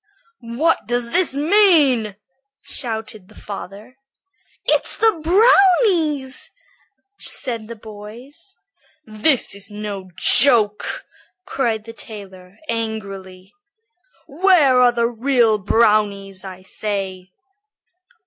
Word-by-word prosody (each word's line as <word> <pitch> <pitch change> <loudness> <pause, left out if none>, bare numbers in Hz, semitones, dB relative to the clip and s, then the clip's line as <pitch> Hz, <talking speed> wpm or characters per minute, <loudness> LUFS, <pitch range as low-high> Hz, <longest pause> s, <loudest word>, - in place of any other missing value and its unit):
"What 330 +4 +1
does 240 -1 -2
this 360 -6 +2
mean?" 295 - +3 0.5
shouted 220 -5 -6
the 215 - -19
father. 205 +5 -10 0.7
"It's - - 0
the 440 -8 +1
brownies," 355 - +2 0.7
said 230 -4 -1
the 235 - -8
boys. 230 - -13 0.5
"This 225 +6 +2
is 200 +1 -6
no 205 -2 -7
joke," 220 -6 +3 0.4
cried 230 - -2
the 230 +1 -11
tailor, 195 -4 -12
angrily. 195 -5 -6 0.7
"Where 305 -5 +3
are 250 -1 +5
the 235 -1 -1
real 235 -2 +1
brownies, 205 -2 0
I 185 -1 -10
say?" 190 -2 -5
225 Hz, 90 wpm, -19 LUFS, 205-280 Hz, 0.7 s, are